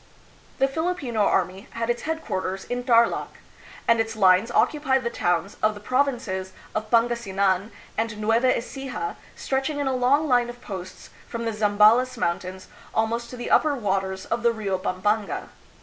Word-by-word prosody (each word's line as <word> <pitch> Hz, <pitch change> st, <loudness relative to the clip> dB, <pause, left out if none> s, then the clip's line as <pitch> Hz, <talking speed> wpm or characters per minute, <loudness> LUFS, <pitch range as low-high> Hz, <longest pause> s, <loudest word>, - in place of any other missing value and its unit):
The 270 Hz, -, +3 dB
Filipino 290 Hz, -6 st, -2 dB
army 190 Hz, -1 st, +1 dB
had 230 Hz, 0 st, 0 dB
its 240 Hz, -, -3 dB
headquarters 190 Hz, -12 st, -3 dB
in 245 Hz, 0 st, -3 dB
Tarlak, 235 Hz, -2 st, +2 dB, 0.5 s
and 230 Hz, -1 st, +4 dB
its 225 Hz, 0 st, -1 dB
lines 190 Hz, +1 st, +4 dB
occupied 265 Hz, 0 st, +2 dB
the 235 Hz, -, -2 dB
towns 175 Hz, +2 st, -1 dB
of 215 Hz, 0 st, +2 dB
the -, -, -9 dB
provinces 235 Hz, -6 st, -1 dB, 0.2 s
of 215 Hz, 0 st, -3 dB
Pangas 235 Hz, 0 st, +2 dB
inan 195 Hz, +1 st, +1 dB, 0.3 s
and 225 Hz, -2 st, -2 dB
Nueva 225 Hz, +4 st, +3 dB
Ecija, 270 Hz, -, -5 dB, 0.2 s
stretching 270 Hz, +2 st, -2 dB
in 285 Hz, -, -1 dB
a 265 Hz, -, +1 dB
long 275 Hz, +5 st, +3 dB
line 245 Hz, -3 st, +3 dB
of 240 Hz, 0 st, -9 dB
posts 185 Hz, -5 st, -8 dB, 0.2 s
from 235 Hz, -1 st, -4 dB
the 225 Hz, -, -1 dB
Zambales 215 Hz, +4 st, +4 dB
Mountains 185 Hz, -2 st, -3 dB, 0.3 s
almost 230 Hz, +2 st, 0 dB
to 250 Hz, -, -8 dB
the 240 Hz, -, -5 dB
upper 300 Hz, -2 st, +4 dB
waters 190 Hz, -4 st, -2 dB
of 235 Hz, -, -2 dB
the 235 Hz, 0 st, +4 dB
Rio 200 Hz, -4 st, -2 dB
Pampanga. 205 Hz, +3 st, -1 dB
230 Hz, 165 wpm, -25 LUFS, 195-250 Hz, 0.5 s, and